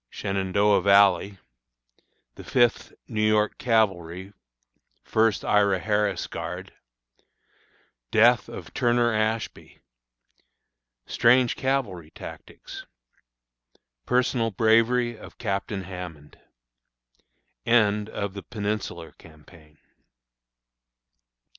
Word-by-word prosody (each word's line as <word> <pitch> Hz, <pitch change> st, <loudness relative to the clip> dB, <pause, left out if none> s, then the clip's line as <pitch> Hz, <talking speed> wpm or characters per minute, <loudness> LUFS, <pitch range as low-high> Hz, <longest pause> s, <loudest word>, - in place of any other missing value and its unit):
Shenandoah 100 Hz, +1 st, +1 dB
Valley. 100 Hz, 0 st, +4 dB, 1.0 s
The -, -, -12 dB
Fifth 120 Hz, -2 st, +1 dB, 0.2 s
New 110 Hz, -3 st, -3 dB
York 110 Hz, 0 st, +1 dB
Cavalry, 95 Hz, -5 st, 0 dB, 0.7 s
First 110 Hz, -1 st, +1 dB
Ira 100 Hz, -2 st, +3 dB
Harris' 105 Hz, -2 st, -1 dB
Guard. -, -, -7 dB, 1.4 s
Death -, -, +4 dB
of -, -, -10 dB
Turner 120 Hz, -1 st, +2 dB
Ashby. 110 Hz, +1 st, -3 dB, 1.3 s
Strange 125 Hz, +1 st, +3 dB
Cavalry 120 Hz, -, -2 dB
Tactics. -, -, -11 dB, 1.2 s
Personal 125 Hz, -2 st, +1 dB
Bravery 115 Hz, +3 st, +2 dB
of -, -, -13 dB
Captain 100 Hz, -2 st, -3 dB
Hammond. 90 Hz, -5 st, -10 dB, 1.2 s
End 105 Hz, -3 st, +2 dB
of 100 Hz, -3 st, -4 dB
the 100 Hz, -, -7 dB
Peninsular 105 Hz, -2 st, -5 dB
Campaign. 75 Hz, 0 st, -18 dB
105 Hz, 80 wpm, -25 LUFS, 95-115 Hz, 1.4 s, Valley